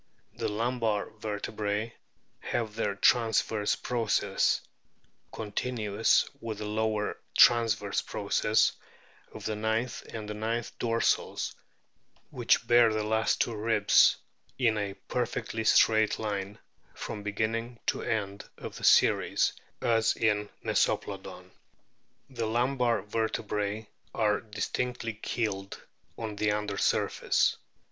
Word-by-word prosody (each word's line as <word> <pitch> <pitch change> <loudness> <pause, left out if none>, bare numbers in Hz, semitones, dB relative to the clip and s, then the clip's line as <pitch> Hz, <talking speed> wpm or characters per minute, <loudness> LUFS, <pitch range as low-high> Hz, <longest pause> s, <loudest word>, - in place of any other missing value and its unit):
The - - -3
lumbar 115 -1 -1
vertebrae 105 +1 -3 0.5
have 115 -3 -3
their 105 -2 -1
transverse 110 -1 +2
processes 115 -4 +1 0.7
(continuous 110 -1 0
with 115 -4 -5
the 105 - -5
lower 110 0 -1 0.2
transverse 110 -4 +4
processes 105 +1 +1 0.6
of - - -10
the 110 - -1
ninth 110 +3 -1
and 110 -2 -6
tenth 110 +2 -3
dorsals, 115 -1 0 0.8
which - - +2
bear 120 -1 +5
the 110 0 -1
last 110 +1 +1
two 120 - 0
ribs) 105 -1 +4 0.4
in 115 -4 +2
a 100 -1 -3
perfectly 120 -2 -2
straight 110 0 +4
line 105 -1 -3 0.4
from 105 - -6
beginning 115 +3 -2
to - - 0
end 100 -2 -3
of - - -8
the - - -11
series - - +4 0.3
as 115 -1 +2
in 105 -2 +1 0.2
Meso - - +2
plodon. - - -9 0.8
The 120 -4 -3
lumbar 120 -1 +1
vertebras 105 -1 -2 0.3
are 105 -2 +2
distinctly 115 +2 -3
keeled 105 -3 -3 0.4
on 110 -2 -5
the 105 0 +1
under 105 -1 -2
surface. - - +1
110 Hz, 110 wpm, -29 LUFS, 105-115 Hz, 0.8 s, bear